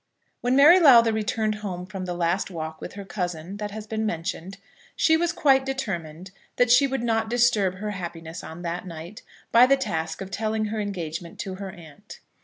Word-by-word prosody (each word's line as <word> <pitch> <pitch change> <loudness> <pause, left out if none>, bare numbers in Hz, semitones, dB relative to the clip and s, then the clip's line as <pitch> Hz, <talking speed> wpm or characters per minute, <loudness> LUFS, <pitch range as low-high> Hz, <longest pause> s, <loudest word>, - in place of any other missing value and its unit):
When 250 +1 +1
Mary 305 +7 +8
Lowther 235 -8 +7
returned 220 0 -1
home 180 -3 -5
from 190 -1 -6
the 180 -1 -4
last 175 +3 0
walk 160 -3 -6
with - - -7
her 200 -1 -8
cousin 180 -1 -4
that 210 0 -4
has 210 +1 -7
been 220 0 -3
mentioned, 185 0 -4 0.4
she 320 - +4
was 340 +1 +1
quite 270 -5 +3
determined 185 -10 -5 0.2
that 245 -1 +3
she 250 +3 +6
would 265 -3 -3
not 225 -1 0
disturb 230 -6 +2
her 210 +3 -4
happiness 170 -3 -7
on 165 +2 -9
that 175 +2 -4
night 170 +4 -9 0.3
by 240 +2 +7
the 275 +1 +4
task 160 -11 -3
of 195 0 -7
telling 220 +1 -1
her 215 +1 -3
engagement 170 -5 -5
to 190 - -5
her 195 +1 -6
aunt. 175 +3 -13
200 Hz, 195 wpm, -25 LUFS, 175-230 Hz, 0.4 s, Mary